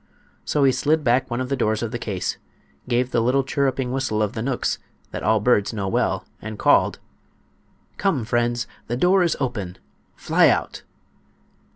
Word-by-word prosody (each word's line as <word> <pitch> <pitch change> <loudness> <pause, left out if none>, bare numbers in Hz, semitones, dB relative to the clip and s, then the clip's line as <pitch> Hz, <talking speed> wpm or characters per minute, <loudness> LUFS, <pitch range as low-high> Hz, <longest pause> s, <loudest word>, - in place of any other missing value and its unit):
So 145 - +1
he 135 - +5
slid 150 +4 +1
back 125 +1 +2
one 120 0 -2
of 130 0 -3
the 140 - +1
doors 110 -3 0
of 115 - -3
the 120 - -4
case, 100 -5 -3 0.5
gave 125 +1 +1
the 115 - +2
little 130 +4 +2
chirruping 135 -2 -1
whistle 120 -5 0
of 105 +1 -2
the 110 - -4
knooks 125 +1 -1 0.3
that - - -5
all 110 0 +3
birds 105 -1 +2
know 100 -3 -3
well, 95 - 0 0.2
and 110 0 -6
called: - - +3 1.0
"Come, 160 - 0
friends; 120 +1 0 0.2
the 120 - -2
door 185 +7 +4
is 170 -3 +1
open—fly 105 -9 -1
out!" - - -1
120 Hz, 170 wpm, -23 LUFS, 110-135 Hz, 1.0 s, he